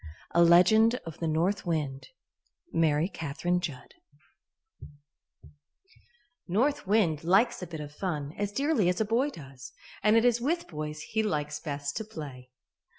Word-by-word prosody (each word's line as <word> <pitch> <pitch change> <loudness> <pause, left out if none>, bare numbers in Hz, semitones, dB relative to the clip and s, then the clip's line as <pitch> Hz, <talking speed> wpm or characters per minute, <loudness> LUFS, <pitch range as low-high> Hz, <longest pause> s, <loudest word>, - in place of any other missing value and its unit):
A 170 - +4
Legend 200 +7 +6
of 165 -2 -8
the 165 - -1
North 170 +6 0
Wind 150 -5 -2 0.7
MARY 160 0 +2
CATHERINE 175 +1 -2
JUDD 150 -8 -6 2.5
North 230 +6 0
wind 185 -8 +2
likes 200 +8 +3
a 180 - -5
bit 160 -2 -7
of 145 0 -8
fun 150 -4 -4
as 205 0 -2
dearly 270 - +1
as 180 - -1
a 220 - +2
boy 235 +7 +1
does, 135 - -11 0.3
and 215 +2 +4
it 230 - +3
is 240 -1 +3
with 335 +7 -1
boys 150 -1 -6
he 220 +7 -1
likes 150 -7 -2
best 140 -1 -4
to - - -3
play. 145 -11 -9
170 Hz, 150 wpm, -28 LUFS, 150-220 Hz, 2.5 s, Legend